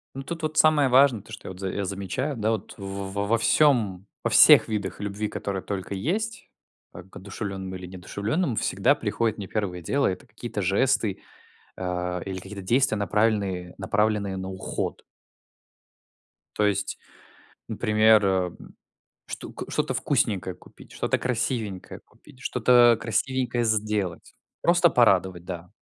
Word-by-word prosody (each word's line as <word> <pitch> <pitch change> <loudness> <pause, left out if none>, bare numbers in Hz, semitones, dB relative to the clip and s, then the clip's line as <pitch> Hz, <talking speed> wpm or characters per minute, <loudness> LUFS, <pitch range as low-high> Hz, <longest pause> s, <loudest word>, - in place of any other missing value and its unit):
Ну 135 - -5
тут 165 +2 -6
вот 155 0 -2
самое 150 -4 +5
важное, 130 -4 +5
то 110 - -17
что 105 - -9
я - - -5
вот 90 - -13
я 95 +1 -2
за - - -3
замечаю, 115 - -3
да 110 +1 +1
вот, 110 - -4
во 100 0 -5
во 100 +1 -2
во 115 +3 +2
всём, 110 -11 +3 0.2
во - - +1
всех - - +8
видах 105 -4 -3
любви, 105 +1 -3
которые 100 -2 -4
только 100 0 -4
есть, 215 - -3 0.4
а 90 - -10
к 95 - -21
одушевленным 95 -1 -6
или 90 -1 -8
неодушевленным, 105 - -2
всегда - - +2
приходит 110 -2 -1
мне 100 - -5
первое 90 -4 -3
дело, 140 - 0
это 90 - -2
какие-то 110 0 -6
жесты, 105 +2 +1 0.5
а, 90 -1 -3
или 95 -1 -4
какие-то 95 +1 -8
действия, 120 +3 +2
направельные 100 -3 0
направленные 100 0 0
на 95 0 -5
уход. 95 0 -4 1.5
То 105 - +2
есть, 100 -1 -1 0.7
например, 110 0 +4
м, 95 -2 -2 0.5
что - - -7
к - - -8
что-то - - -1
вкусненькое - - 0
купить, - - -17
что-то - - 0
красивенькое 115 -5 -3
купить, 135 -4 -20
что-то, 120 -2 +4
красивенькое 120 +1 -1
сделать, 105 -5 -1 0.3
просто - - +4
порадовать, 90 -2 +3
да. 90 -1 -7
105 Hz, 150 wpm, -25 LUFS, 95-120 Hz, 1.5 s, всех